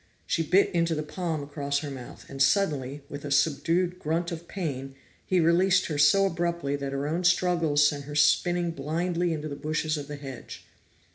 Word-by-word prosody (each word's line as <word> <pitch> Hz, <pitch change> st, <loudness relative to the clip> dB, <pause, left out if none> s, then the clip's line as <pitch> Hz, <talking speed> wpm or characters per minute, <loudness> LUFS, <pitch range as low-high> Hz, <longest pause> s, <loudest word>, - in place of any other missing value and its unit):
She -, -, 0 dB
bit 185 Hz, +5 st, +3 dB
into 170 Hz, -1 st, +1 dB
the 155 Hz, -, -2 dB
palm 160 Hz, -1 st, -3 dB
across 140 Hz, -1 st, -2 dB
her 145 Hz, -2 st, -5 dB
mouth 130 Hz, -3 st, -10 dB
and 135 Hz, 0 st, -6 dB
suddenly, 145 Hz, -4 st, +1 dB
with 145 Hz, 0 st, -8 dB
a 145 Hz, -, -5 dB
subdued 165 Hz, +5 st, +1 dB
grunt 165 Hz, +3 st, -1 dB
of 170 Hz, 0 st, -7 dB
pain, 135 Hz, -8 st, -5 dB, 0.3 s
he 185 Hz, -, +2 dB
released 180 Hz, +3 st, +3 dB
her 150 Hz, -3 st, -3 dB
so 170 Hz, +7 st, +5 dB
abruptly 170 Hz, -5 st, -1 dB
that 140 Hz, -1 st, -4 dB
her 140 Hz, +1 st, -2 dB
own 165 Hz, +4 st, -1 dB
struggles 170 Hz, -4 st, +3 dB
sent 145 Hz, -1 st, -3 dB
her 145 Hz, 0 st, -7 dB
spinning 175 Hz, +4 st, +3 dB
blindly 170 Hz, +4 st, -1 dB
into 155 Hz, -1 st, -3 dB
the 145 Hz, -, -5 dB
bushes 155 Hz, +1 st, -2 dB
of 145 Hz, -1 st, -6 dB
the 150 Hz, -, -6 dB
hedge. 135 Hz, -4 st, -9 dB
155 Hz, 190 wpm, -27 LUFS, 145-175 Hz, 0.3 s, so